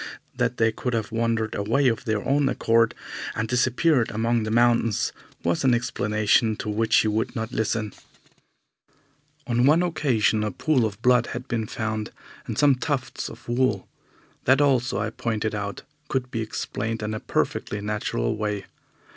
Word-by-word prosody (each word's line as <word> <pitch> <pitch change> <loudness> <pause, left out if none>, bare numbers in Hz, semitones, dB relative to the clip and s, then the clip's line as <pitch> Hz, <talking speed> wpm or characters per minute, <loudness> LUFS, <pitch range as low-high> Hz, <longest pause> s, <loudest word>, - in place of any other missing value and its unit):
That 125 0 0
they 115 0 +3
could 125 +2 -3
have 110 -2 -2
wandered 115 -1 0
away 115 +7 +1
of 120 +1 0
their 110 -3 -1
own 140 0 +3
accord 115 -2 +2 0.4
and 110 +1 -1
disappeared 125 +2 +2
among 115 +2 0
the 110 - -3
mountains 115 -1 +2 0.3
was 85 0 0
an 130 -3 +4
explanation 110 -2 +1
to 105 - -5
which 110 +2 +1
he - - +4
would 110 +4 -1
not 110 0 -3
listen. 110 -3 -1 1.5
On 120 -1 +1
one 160 +4 +5
occasion 130 -11 +1
a 105 - 0
pool 125 - +1
of 100 -2 -9
blood 125 -1 +4
had 125 +2 -6
been 115 -4 -2
found, 110 -1 -3 0.4
and - - -4
some 145 -1 +5
tufts 130 +1 -3
of - - -13
wool. 130 +2 0 0.6
That 130 +2 +5
also, 130 -6 +2
I 105 +2 -1
pointed 110 -2 -2
out, 100 -1 -4 0.2
could 125 -1 -2
be 115 - -2
explained 110 0 -3
in 105 +1 -2
a 110 - -3
perfectly 105 - -2
natural 105 - -2
way. 105 -2 -3
115 Hz, 165 wpm, -25 LUFS, 110-125 Hz, 1.5 s, one